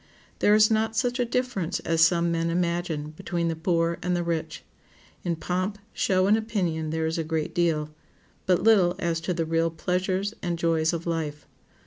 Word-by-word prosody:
There 210 - +5
is 215 +1 +5
not 220 0 +1
such 245 +1 0
a 245 - +2
difference 240 -8 -1
as 165 0 +2
some 170 0 +3
men 165 0 0
imagine 170 -3 -1
between 170 +2 -2
the 165 - -2
poor 165 0 0
and 180 0 0
the 175 - 0
rich. 160 -2 -3 0.6
In 170 -1 -1
pomp, 185 +5 -2 0.2
show, 185 -6 +2
and 205 +2 +5
opinion 180 -8 -1
there 160 0 -1
is 160 +1 -1
a - - 0
great 160 -1 -2
deal, 155 -3 0 0.6
but 180 -1 +3
little 195 -5 +5
as 170 -3 -1
to 180 - -2
the 165 -1 -1
real 165 +1 +1
pleasures 185 +4 -1
and 175 -2 -2
joys 165 -1 +1
of 170 -1 -4
life. 160 -3 -3
170 Hz, 185 wpm, -26 LUFS, 165-185 Hz, 0.6 s, There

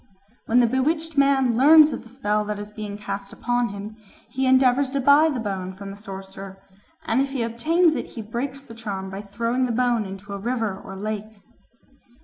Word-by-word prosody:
When 245 +2 +4
the - - +5
bewitched 310 +6 0
man 275 -4 +3
learns 305 +4 +7
of - - -5
the 230 - -15
spell 210 -4 -1
that 210 0 -3
is 205 0 -8
being 210 -1 -6
cast 200 -1 -6
upon 245 0 -1
him, 205 +2 -8 0.3
he 265 +1 0
endeavours 260 +1 +4
to 280 - 0
buy 285 +4 +5
the 275 -5 -2
bone 190 -4 -4
from 195 +1 -8
the - - -8
sorcerer, 195 -1 -9 0.5
and 240 +4 +2
if 275 - -1
he 255 -4 -1
obtains 310 +9 +2
it - - -4
he 225 - -8
breaks 260 +6 -5
the 245 -4 -12
charm 200 -4 -5
by 195 +1 -5
throwing 230 +5 -1
the - - -2
bone 240 -2 +1
into 195 +1 -8
a 200 - -5
river 225 -2 -1
or 195 0 -10
lake. 215 +1 -5
230 Hz, 200 wpm, -23 LUFS, 200-260 Hz, 0.5 s, learns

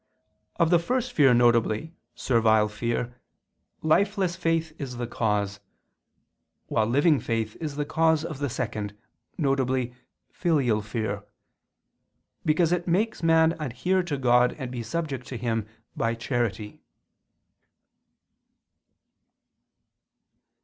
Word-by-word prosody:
Of 170 -1 +2
the 175 - +6
first 250 +7 -1
fear, 140 -4 +5
viz. 120 +3 +3 0.3
servile 110 -3 +3
fear, 120 +3 -3 0.6
lifeless 190 +2 +2
faith 165 -2 0
is 130 -4 -5
the 120 - -2
cause, 105 -4 -1 1.1
while 110 -1 +1
living 145 +5 +3
faith 115 -2 -2
is 150 -3 -4
the 145 0 -2
cause 160 0 +2
of 155 -5 -6
the 145 -1 -1
second, 105 -4 -4 0.4
viz. 130 -4 +1 0.4
filial 135 - +1
fear, 105 -1 -3 1.2
because 160 +2 +2
it 180 0 0
makes 205 +5 0
man 165 -1 +4
adhere 155 +7 0
to 165 -5 -3
God 125 -1 +3
and 130 -4 -6
to 125 - -6
be - - -2
subject 135 0 -4
to 125 - -5
Him 115 -2 -2 0.3
by 115 0 0
charity. 115 -3 -3
130 Hz, 115 wpm, -26 LUFS, 115-160 Hz, 1.2 s, the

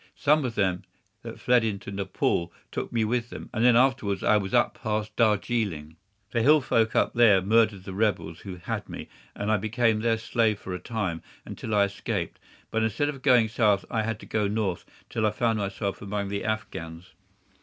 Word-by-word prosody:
Some 150 +1 +3
of 120 -3 -3
them 95 -3 +1 0.4
that - - -9
fled 125 -1 +3
into 100 -2 -3
Nepaul 95 -3 -1 0.2
took - - -4
me 115 -2 +1
with 120 +1 -1
them, - - -9
and 110 -1 0
then 125 -1 +6
afterwards 120 -6 +2
I 110 - +4
was 100 -2 0
up - - +3
past 105 0 -2
Darjeeling. 105 -8 0 0.4
The 115 - +1
hill 150 +6 +6
folk 115 -4 +1
up - - +2
there 115 -5 +6
murdered 105 0 +2
the 95 - -7
rebels 95 -6 -1
who 95 -2 -8
had 90 - -5
me, - - -8 0.3
and 105 +1 -2
I 110 - +4
became 110 +2 +1
their 115 0 +1
slave 110 -1 +1
for 95 - -6
a 90 - -4
time 95 -8 -3 0.2
until 110 - -4
I 100 - +5
escaped; 100 +1 -3 0.3
but 115 - 0
instead 110 +7 0
of 135 -3 -6
going 125 -4 +5
south 105 -3 +2
I 115 - +1
had 110 -1 -3
to - - -10
go 105 -2 0
north, 100 -3 -2 0.2
until 110 -1 -1
I - - +3
found 115 +1 0
myself 100 0 -3
among 100 0 -3
the 100 0 -3
Afghans. 90 -6 -5
110 Hz, 195 wpm, -26 LUFS, 100-115 Hz, 0.4 s, then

